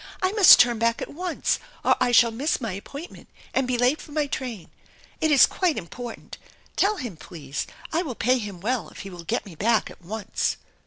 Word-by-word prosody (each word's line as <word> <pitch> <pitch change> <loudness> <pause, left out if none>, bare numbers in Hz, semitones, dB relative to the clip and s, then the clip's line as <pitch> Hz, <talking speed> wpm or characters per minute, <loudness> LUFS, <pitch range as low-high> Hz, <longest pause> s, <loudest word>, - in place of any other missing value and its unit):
I 370 - +2
must 415 -3 +8
turn 240 -2 +4
back 230 0 +1
at - - -6
once 355 +2 -1 0.3
or - - +5
I 245 - +3
shall 235 -1 +6
miss 270 +8 -1
my 230 -5 -3
appointment 280 - -9 0.2
and 265 -1 +1
be 250 -1 0
late 250 +5 +2
for - - -13
my 300 0 0
train. 245 -9 -5 0.5
It 315 - +2
is 285 -3 +8
quite 360 -5 0
important. 235 +7 -8 0.4
Tell 410 +2 +2
him, 240 - -6
please, 155 -3 -6 0.3
I 330 - +2
will 280 -9 -5
pay 250 +4 +2
him 200 -5 -7
well 245 +3 -1
if - - -11
he 195 - -8
will 175 -1 -9
get 235 - -1
me 195 - -11
back 220 +7 +1
at - - -16
once." 205 +3 -2
240 Hz, 210 wpm, -24 LUFS, 210-290 Hz, 0.5 s, must